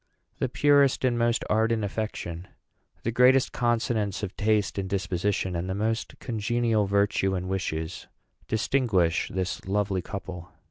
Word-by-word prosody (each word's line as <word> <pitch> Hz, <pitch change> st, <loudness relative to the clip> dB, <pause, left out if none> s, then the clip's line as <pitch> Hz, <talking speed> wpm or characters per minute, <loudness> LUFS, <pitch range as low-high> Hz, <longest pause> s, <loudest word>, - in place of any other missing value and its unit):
The -, -, 0 dB
purest 140 Hz, -1 st, +3 dB
and 125 Hz, -2 st, +2 dB
most 120 Hz, 0 st, +1 dB
ardent 110 Hz, 0 st, +2 dB
affection, 95 Hz, -4 st, -4 dB, 0.6 s
the 115 Hz, -, 0 dB
greatest 125 Hz, +2 st, +4 dB
consonance 115 Hz, -4 st, 0 dB
of 100 Hz, -1 st, -4 dB
taste 105 Hz, -2 st, +1 dB
and 95 Hz, -1 st, -3 dB
disposition, 95 Hz, -1 st, -1 dB
and 85 Hz, +2 st, -3 dB
the 95 Hz, -, -1 dB
most 110 Hz, +3 st, -2 dB
congenial 115 Hz, -2 st, 0 dB
virtue 100 Hz, -1 st, +1 dB
and 90 Hz, 0 st, -3 dB
wishes 80 Hz, -4 st, -3 dB, 0.4 s
distinguish 110 Hz, -7 st, +1 dB
this 95 Hz, 0 st, -3 dB
lovely 100 Hz, -1 st, 0 dB
couple. 90 Hz, -2 st, -7 dB
105 Hz, 135 wpm, -27 LUFS, 95-115 Hz, 0.6 s, greatest